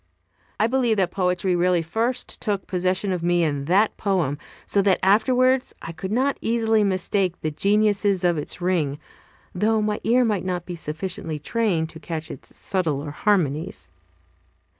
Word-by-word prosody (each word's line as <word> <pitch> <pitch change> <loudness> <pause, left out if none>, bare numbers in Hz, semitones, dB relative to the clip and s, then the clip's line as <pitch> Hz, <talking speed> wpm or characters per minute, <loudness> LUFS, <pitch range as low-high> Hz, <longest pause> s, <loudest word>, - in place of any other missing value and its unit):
I 215 - +4
believe 240 -2 +1
that 185 -3 +1
poetry 180 -1 0
really 175 -1 +2
first 230 +9 -2
took 205 -3 -1
possession 185 +1 -1
of 180 - -3
me 175 0 +2
in 145 -3 -1
that 195 +7 +3
poem, 175 -8 0 0.3
so 200 - +2
that 195 -1 +3
afterwards 255 +6 +3
I 165 - -7
could 175 +4 -6
not 265 +5 +1
easily 225 -1 +2
mistake 185 -1 0
the 155 - -1
genuineness 200 +2 +2
of 175 -1 +3
its 150 - -4
ring, 165 -6 0 0.6
though 215 +4 +2
my 210 0 -1
ear 245 +3 +3
might 210 -4 0
not 180 -2 -3
be 175 - -6
sufficiently 165 +1 -4
trained 175 -2 0
to 160 - -10
catch 160 -1 -5
its 135 - -11
subtler 155 -6 -2
harmonies. 165 -2 0
185 Hz, 160 wpm, -23 LUFS, 170-210 Hz, 0.6 s, I